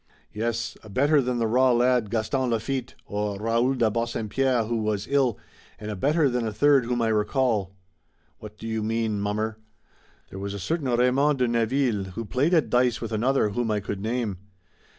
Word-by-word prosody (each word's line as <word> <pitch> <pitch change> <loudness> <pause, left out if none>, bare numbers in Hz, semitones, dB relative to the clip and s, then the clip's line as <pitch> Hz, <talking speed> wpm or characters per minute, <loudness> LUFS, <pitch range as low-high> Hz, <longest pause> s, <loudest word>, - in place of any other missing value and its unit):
"Yes, 115 +1 -2
a 110 - -13
better 145 +7 +3
than 125 -1 -1
the 115 - +1
raw 125 +3 +3
lad, 120 -2 +2
Gaston 120 +4 -1
Lafitte, 120 +2 -2
or 105 0 -3
Raoul 115 +4 +1
de 115 -4 +2
Bassempierre 115 +2 0
who 115 +1 -1
was 105 -2 -1
ill, 135 -6 +2 0.4
and 105 +1 -6
a - - -4
better 150 - +2
than 125 -2 -1
a - - -2
third 140 +3 +4
whom 120 0 0
I 115 - +1
recall." 105 -2 0 0.6
"What 105 0 -11
do 110 - -10
you 110 -1 -2
mean, 110 -1 -1
mummer?" 110 +2 -2 0.7
"There 95 - -7
was 100 +1 -4
a - - -5
certain 140 - -2
Raymond 125 +4 +3
de 125 -1 +2
Neville 115 -2 +1
who 115 +3 -5
played 145 - +1
at 160 - +1
dice 125 -1 +2
with 115 - -5
another 115 +1 +1
whom 120 +2 -2
I 105 -1 +1
could 100 -1 -5
name. 110 -4 -2
115 Hz, 190 wpm, -25 LUFS, 105-130 Hz, 0.7 s, third